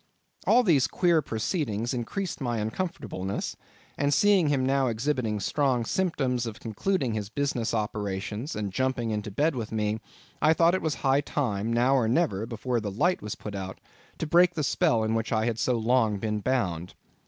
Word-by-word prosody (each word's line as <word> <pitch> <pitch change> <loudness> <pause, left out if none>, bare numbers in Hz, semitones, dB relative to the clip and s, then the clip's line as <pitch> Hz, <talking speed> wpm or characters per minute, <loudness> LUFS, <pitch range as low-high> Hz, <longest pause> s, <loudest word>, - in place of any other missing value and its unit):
All 250 - +6
these 155 - +4
queer 170 -3 +2
proceedings 115 - -2
increased 155 - -3
my 120 -3 -1
uncomfortableness, 110 - -3 0.4
and 145 0 +2
seeing 195 0 +4
him 140 -3 +1
now 135 0 +2
exhibiting 115 -2 -1
strong 130 +1 +1
symptoms 130 -8 0
of 110 -1 -7
concluding 130 - -1
his 105 -2 -3
business 125 -2 -1
operations, 105 - -3
and 105 -3 -3
jumping 130 -1 0
into 105 0 -3
bed 145 +9 +1
with 115 -4 -4
me, 105 0 -1 0.4
I 155 +2 +5
thought 165 +1 +4
it 185 - 0
was 155 -2 -1
high 135 +1 +4
time, 115 -7 -1
now 120 +3 +3
or 125 -5 +3
never, 115 - +1
before 120 +1 -2
the 105 -2 -3
light 175 - +1
was 105 - -5
put 105 - -7
out, 95 -1 -6 0.4
to - - -2
break 175 +3 +4
the 155 - -1
spell 115 -4 +2
in 110 0 0
which 115 0 -1
I 110 -1 +1
had 115 -1 -1
so 125 -2 +1
long 115 -2 +2
been 105 +1 -2
bound. 95 -8 -1
120 Hz, 180 wpm, -27 LUFS, 110-145 Hz, 0.4 s, All